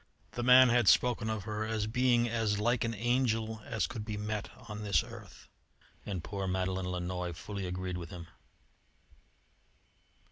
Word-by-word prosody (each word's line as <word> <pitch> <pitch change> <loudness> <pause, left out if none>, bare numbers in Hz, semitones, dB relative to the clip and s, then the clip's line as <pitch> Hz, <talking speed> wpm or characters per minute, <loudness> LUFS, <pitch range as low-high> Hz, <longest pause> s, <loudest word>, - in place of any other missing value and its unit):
The 120 - -4
man 125 +1 +8
had 120 -3 +3
spoken 120 -3 +3
of 110 -3 -2
her 105 0 -3
as 110 -1 -1
being 120 +1 +2
as 110 -3 0
like 120 +2 +1
an 115 -1 -2
angel 115 -1 0
as 110 - -1
could 115 -5 -5
be 105 -1 -4
met 105 0 -3 0.2
on 105 -1 -6
this 100 -6 +2
earth, - - -12 0.6
and 95 -5 -3
poor 100 -1 -4
Madeleine 95 0 -1
Lannoy 90 0 -3
fully 100 +1 -5
agreed 90 0 -3
with 85 - -7
him. 90 -3 -8
105 Hz, 155 wpm, -31 LUFS, 95-115 Hz, 0.6 s, man